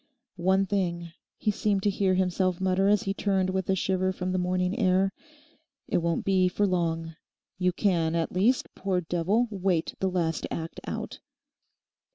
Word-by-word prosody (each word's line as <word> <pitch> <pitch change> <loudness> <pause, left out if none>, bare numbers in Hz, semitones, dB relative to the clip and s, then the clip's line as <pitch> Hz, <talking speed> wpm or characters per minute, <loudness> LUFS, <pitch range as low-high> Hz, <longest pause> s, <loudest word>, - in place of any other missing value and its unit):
'One 190 +2 +2
thing,' 175 -4 -2 0.3
he 215 - +1
seemed 205 -1 0
to 205 - +3
hear 190 -1 +1
himself 185 -1 +1
mutter 190 +1 +2
as 205 -1 +3
he 195 - -1
turned 190 -2 0
with 190 0 -2
a 190 - +3
shiver 185 0 0
from 185 -1 -3
the 185 - 0
morning 180 +1 0
air, 190 -1 +2 0.7
'it - - +1
won't 170 -1 -1
be 190 -2 +3
for 205 +3 +1
long. 165 -3 -1 0.4
You 180 0 +2
can, 170 -4 +1
at 165 -1 0
least, 220 +8 +1
poor 190 -2 -1
devil, 180 +8 +1
wait 185 -4 0
the 190 - +1
last 165 -3 -1
act 165 0 -5
out. - - -5
185 Hz, 170 wpm, -27 LUFS, 175-195 Hz, 0.7 s, to